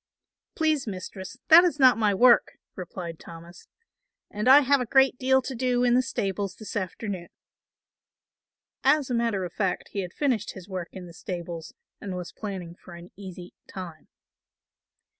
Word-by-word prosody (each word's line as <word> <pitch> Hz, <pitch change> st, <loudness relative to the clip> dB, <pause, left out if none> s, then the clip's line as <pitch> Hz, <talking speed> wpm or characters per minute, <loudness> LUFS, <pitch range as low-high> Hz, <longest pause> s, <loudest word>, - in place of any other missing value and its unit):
"Please, 310 Hz, -5 st, +1 dB
Mistress, 190 Hz, +2 st, -7 dB
that 335 Hz, +2 st, +10 dB
is 350 Hz, -4 st, +1 dB
not 260 Hz, -2 st, +7 dB
my 215 Hz, -2 st, +2 dB
work," 240 Hz, +4 st, +5 dB, 0.2 s
replied 175 Hz, -2 st, -7 dB
Thomas, 170 Hz, +2 st, -13 dB, 0.6 s
"and 210 Hz, +4 st, 0 dB
I 280 Hz, +3 st, +9 dB
have 280 Hz, 0 st, +3 dB
a 245 Hz, -, -3 dB
great 265 Hz, 0 st, +3 dB
deal 265 Hz, 0 st, +3 dB
to 265 Hz, -, -5 dB
do 250 Hz, 0 st, 0 dB
in 245 Hz, -1 st, +3 dB
the 250 Hz, -, +5 dB
stables 200 Hz, -5 st, -3 dB
this 215 Hz, -, -9 dB
afternoon." 190 Hz, -2 st, -4 dB, 1.5 s
As 295 Hz, -4 st, +3 dB
a -, -, 0 dB
matter 230 Hz, -5 st, 0 dB
of 175 Hz, -, -8 dB
fact 190 Hz, -4 st, -2 dB
he 200 Hz, -, -5 dB
had 180 Hz, -2 st, -4 dB
finished 245 Hz, -3 st, -1 dB
his 190 Hz, -2 st, -11 dB
work 185 Hz, -4 st, -5 dB
in 185 Hz, -2 st, -8 dB
the 170 Hz, -, -12 dB
stables 170 Hz, -2 st, -7 dB, 0.2 s
and 195 Hz, -2 st, -6 dB
was 180 Hz, -1 st, -6 dB
planning 190 Hz, -5 st, -6 dB
for 175 Hz, 0 st, -14 dB
an 170 Hz, +1 st, -12 dB
easy 185 Hz, -2 st, -10 dB
time. 170 Hz, -5 st, -9 dB
200 Hz, 165 wpm, -26 LUFS, 180-250 Hz, 1.5 s, that